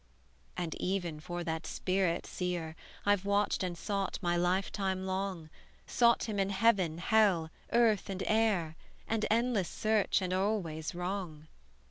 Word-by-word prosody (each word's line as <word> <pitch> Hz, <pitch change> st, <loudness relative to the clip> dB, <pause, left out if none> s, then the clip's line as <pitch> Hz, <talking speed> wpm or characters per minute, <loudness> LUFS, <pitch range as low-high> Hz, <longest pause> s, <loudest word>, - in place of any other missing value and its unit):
"And 175 Hz, -3 st, -2 dB
even 175 Hz, -4 st, -1 dB
for 175 Hz, +3 st, -5 dB
that 160 Hz, -1 st, -3 dB
spirit, 185 Hz, -2 st, 0 dB
seer, 175 Hz, -3 st, -3 dB, 0.3 s
I've 205 Hz, -2 st, +3 dB
watched 200 Hz, +1 st, +1 dB
and 180 Hz, -2 st, -2 dB
sought 195 Hz, +2 st, -2 dB
my 175 Hz, -3 st, 0 dB
life 180 Hz, +2 st, +1 dB
time 190 Hz, -1 st, -2 dB
long; 190 Hz, -4 st, -3 dB, 0.3 s
Sought 235 Hz, -1 st, +3 dB
him 215 Hz, -3 st, -2 dB
in 195 Hz, 0 st, +1 dB
heaven, 195 Hz, -5 st, +2 dB
hell, 180 Hz, -4 st, +3 dB, 0.2 s
earth, 225 Hz, -4 st, +3 dB
and 190 Hz, -1 st, -3 dB
air, 210 Hz, -8 st, +1 dB, 0.3 s
An 225 Hz, -1 st, 0 dB
endless 225 Hz, -5 st, +1 dB
search, 215 Hz, -2 st, +1 dB
and 185 Hz, 0 st, -1 dB
always 185 Hz, -5 st, -1 dB
wrong. 175 Hz, -4 st, -4 dB
190 Hz, 140 wpm, -32 LUFS, 175-205 Hz, 0.3 s, I've